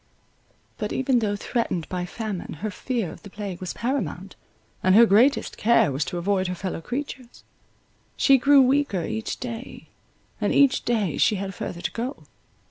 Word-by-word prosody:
But, 210 Hz, -2 st, -3 dB
even 260 Hz, -1 st, +2 dB
though 205 Hz, -2 st, 0 dB
threatened 200 Hz, -, -2 dB
by 180 Hz, -1 st, -3 dB
famine, 215 Hz, -3 st, -5 dB
her 215 Hz, 0 st, -2 dB
fear 230 Hz, -4 st, -3 dB
of -, -, -12 dB
the 200 Hz, -, -11 dB
plague 200 Hz, -3 st, -6 dB
was 185 Hz, -, -5 dB
paramount; 200 Hz, -, -3 dB, 0.5 s
and 185 Hz, +1 st, +4 dB
her 235 Hz, +2 st, +9 dB
greatest 230 Hz, +7 st, +3 dB
care 230 Hz, -9 st, +4 dB
was 135 Hz, +3 st, -1 dB
to 180 Hz, -, -4 dB
avoid 190 Hz, +1 st, 0 dB
her 180 Hz, -, -3 dB
fellow 185 Hz, -2 st, -4 dB
creatures. 255 Hz, -, -6 dB, 0.7 s
She 270 Hz, -2 st, +5 dB
grew 280 Hz, +1 st, +6 dB
weaker 255 Hz, -, +1 dB
each 220 Hz, +1 st, -4 dB
day, 240 Hz, 0 st, -7 dB, 0.5 s
and -, -, +1 dB
each 280 Hz, -2 st, +4 dB
day 210 Hz, -, 0 dB
she 215 Hz, -, +4 dB
had 195 Hz, 0 st, -4 dB
further 175 Hz, -1 st, -6 dB
to -, -, -2 dB
go. 250 Hz, +5 st, -5 dB
215 Hz, 170 wpm, -24 LUFS, 185-250 Hz, 0.7 s, her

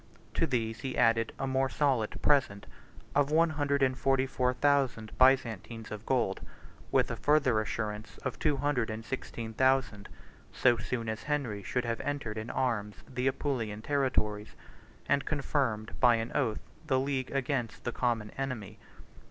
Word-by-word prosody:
To 165 Hz, -, +1 dB
these 115 Hz, -4 st, -1 dB
he 130 Hz, 0 st, -4 dB
added 115 Hz, -1 st, +3 dB
a -, -, -2 dB
more 135 Hz, 0 st, +1 dB
solid 130 Hz, -8 st, 0 dB
present, 130 Hz, -9 st, +2 dB, 0.5 s
of 145 Hz, 0 st, +3 dB
one 160 Hz, +2 st, +4 dB
hundred 145 Hz, -2 st, +1 dB
and 130 Hz, -1 st, +2 dB
forty 135 Hz, 0 st, +2 dB
four 125 Hz, -1 st, +1 dB
thousand 130 Hz, -5 st, +1 dB
Byzantines 115 Hz, -4 st, +2 dB
of 105 Hz, +1 st, -7 dB
gold, 120 Hz, -7 st, +1 dB, 0.5 s
with -, -, +3 dB
a -, -, -2 dB
further 140 Hz, -7 st, +3 dB
assurance 105 Hz, 0 st, -4 dB
of 130 Hz, -, -3 dB
two 150 Hz, -3 st, +2 dB
hundred 135 Hz, -5 st, 0 dB
and 110 Hz, +1 st, -5 dB
sixteen 115 Hz, -3 st, -5 dB
thousand, 130 Hz, -5 st, +1 dB, 0.4 s
so 120 Hz, -1 st, +3 dB
soon 115 Hz, -2 st, -3 dB
as 110 Hz, 0 st, -3 dB
Henry 135 Hz, -9 st, -2 dB
should 125 Hz, +5 st, -2 dB
have 115 Hz, 0 st, -2 dB
entered 130 Hz, -7 st, -3 dB
in 110 Hz, +2 st, -6 dB
arms 105 Hz, -5 st, -1 dB
the 125 Hz, 0 st, -2 dB
Apulian 115 Hz, -6 st, -2 dB
territories, 110 Hz, -7 st, 0 dB, 0.5 s
and 140 Hz, -1 st, +2 dB
confirmed 135 Hz, -7 st, -1 dB
by 120 Hz, -2 st, +6 dB
an 115 Hz, +1 st, -3 dB
oath 115 Hz, -7 st, 0 dB, 0.3 s
the 130 Hz, -3 st, +3 dB
league 135 Hz, -1 st, -1 dB
against 135 Hz, -4 st, -2 dB
the 120 Hz, -, -2 dB
common 115 Hz, -4 st, -1 dB
enemy. 110 Hz, -6 st, -5 dB
125 Hz, 160 wpm, -30 LUFS, 110-135 Hz, 0.5 s, by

